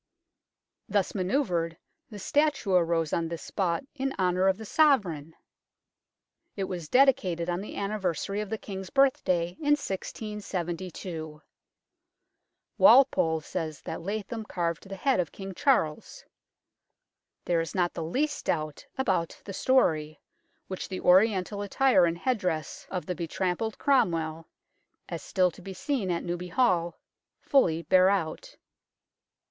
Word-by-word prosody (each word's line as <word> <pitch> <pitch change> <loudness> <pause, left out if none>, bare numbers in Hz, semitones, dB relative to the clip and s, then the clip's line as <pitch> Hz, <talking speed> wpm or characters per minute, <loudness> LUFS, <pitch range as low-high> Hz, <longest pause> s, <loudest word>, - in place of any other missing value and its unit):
Thus 200 -2 +1
manoeuvred, 180 - 0 0.3
the 210 - -9
statue 290 -1 +1
arose 170 -3 +2
on 165 -1 0
this 165 0 -6
spot 180 -1 -1
in 270 -1 -3
honour 185 0 +2
of 190 0 +3
the 220 - -8
Sovereign! 200 - +2 1.2
It 195 - -2
was 175 -5 -5
dedicated 185 -11 +3
on 175 +2 -2
the 205 - -8
anniversary 200 -1 -2
of 210 - -6
the 220 - -2
King's 190 -3 -7
birthday 185 -11 +2
in 295 -1 +3
1672; 180 - -5 1.4
Walpole 250 - +5
says 160 -2 -5
that - - -5
Latham 215 +4 -4
carved 170 -2 -3
the 195 - -5
head 265 +3 +1
of 170 -4 -1
King 195 -1 -7
Charles. 170 - 0 1.2
There 170 -2 +2
is 165 - -6
not 175 -2 +1
the 165 - -4
least 290 - -1
doubt 155 -3 -2
about 190 -10 0
the 195 - -6
story, 155 - +2 0.5
which 185 - -5
the 185 - -4
Oriental 195 +1 +3
attire 205 -1 +3
and 165 0 -2
headdress 180 - -2
of 180 -2 -4
the 180 - -2
betrampled 180 +6 -2
Cromwell, 165 - +1 0.6
as - - -5
still 185 -2 +1
to 175 - -15
be 190 +1 -8
seen 245 -4 -2
at 170 -1 -1
Newby 175 +1 -4
Hall, 180 -4 +1 0.4
fully 170 - +2
bear 185 +1 +5
out. 200 - -2
185 Hz, 130 wpm, -28 LUFS, 170-215 Hz, 1.4 s, Walpole